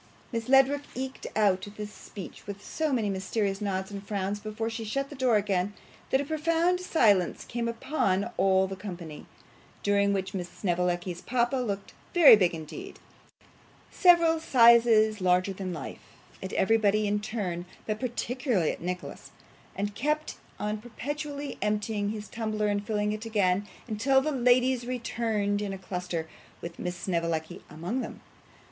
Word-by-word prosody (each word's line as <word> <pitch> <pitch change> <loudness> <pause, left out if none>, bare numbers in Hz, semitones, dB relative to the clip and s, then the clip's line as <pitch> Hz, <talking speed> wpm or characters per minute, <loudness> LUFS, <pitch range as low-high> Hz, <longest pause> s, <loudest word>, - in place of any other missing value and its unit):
Miss 230 0 -3
Ledrook 270 +2 +5
eked 265 +1 -5
out 195 -3 +2
this 210 0 -6
speech 195 -2 -10
with 200 0 -7
so 315 -2 -1
many 235 -5 +1
mysterious 195 +1 -1
nods 190 -1 -2
and 200 -1 -5
frowns 200 0 -2
before 215 +2 -4
she 225 0 -4
shut 275 +6 -2
the - - -7
door 255 -4 +2
again, 200 -1 0 0.3
that 265 - +3
a 285 - -2
profound 330 +4 +1
silence 215 - +2
came 235 -1 -3
upon 230 -4 0
all 190 0 +3
the 190 0 -5
company, 175 -6 -8 0.6
during 200 0 +3
which 195 0 -2
Miss 180 -2 -4
Snevellicci's 175 -1 -1
papa 245 +2 +1
looked 205 -6 -3 0.2
very 330 -9 +10
big 180 -5 +2
indeed 370 - -8 0.9
several 335 -3 +5
sizes 230 -6 +5
larger 185 +1 +2
than 190 -1 -5
life 155 -6 -6 0.4
at 190 - -5
everybody 215 0 +3
in 205 0 +1
turn, 190 -5 -4 0.2
but 215 0 -2
particularly 245 - 0
at - - -8
Nicholas, 180 +1 -5 0.5
and 205 +1 -2
kept 300 +7 -1 0.2
on 210 +1 -2
perpetually 285 +5 -5
emptying 210 0 0
his 210 0 -5
tumbler 215 -2 -1
and 205 0 -1
filling 210 -1 0
it 215 +2 -4
again, 200 -2 +1 0.2
until 250 +5 +3
the 305 +3 -1
ladies 250 -1 +3
returned 225 -4 -1
in 205 -1 -2
a 195 - -4
cluster, 180 -3 -4 0.3
with 170 0 -8
Miss 180 0 -3
Snevellicci 170 -3 -2
among 175 +12 -3
them. - - -7
210 Hz, 155 wpm, -28 LUFS, 190-245 Hz, 0.9 s, very